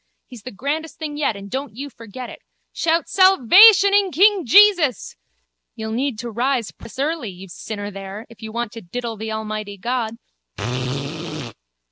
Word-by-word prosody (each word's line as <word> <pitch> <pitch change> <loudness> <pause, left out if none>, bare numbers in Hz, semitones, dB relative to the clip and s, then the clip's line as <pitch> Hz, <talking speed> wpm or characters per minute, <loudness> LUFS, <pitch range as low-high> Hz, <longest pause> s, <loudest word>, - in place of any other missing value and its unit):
He's 245 -4 -12
the 255 - -8
grandest 300 +8 -4
thing 305 -2 -5
yet 290 -7 0
and 200 0 -9
don't 265 +1 -5
you 280 +3 -7
forget 235 +2 -9
it. - - -11 0.3
Shout 330 0 0
salvation 390 - +7
in 400 -2 +3
King 385 - +4
Jesus. 360 - +4 0.6
You'll 220 0 -5
need 250 +1 -1
to 235 +1 -6
rise 245 0 -1
precious 230 - -14
early, 290 -3 -2
you 190 +1 -11
sinner 205 +3 -7
there, 195 +2 -8
if 230 - -17
you 220 0 -7
want 235 -1 -3
to 230 - -9
diddle 230 +5 -5
the 220 +1 -6
Almighty 215 -2 -5
God. 230 +1 -2
240 Hz, 160 wpm, -21 LUFS, 220-315 Hz, 0.6 s, salvation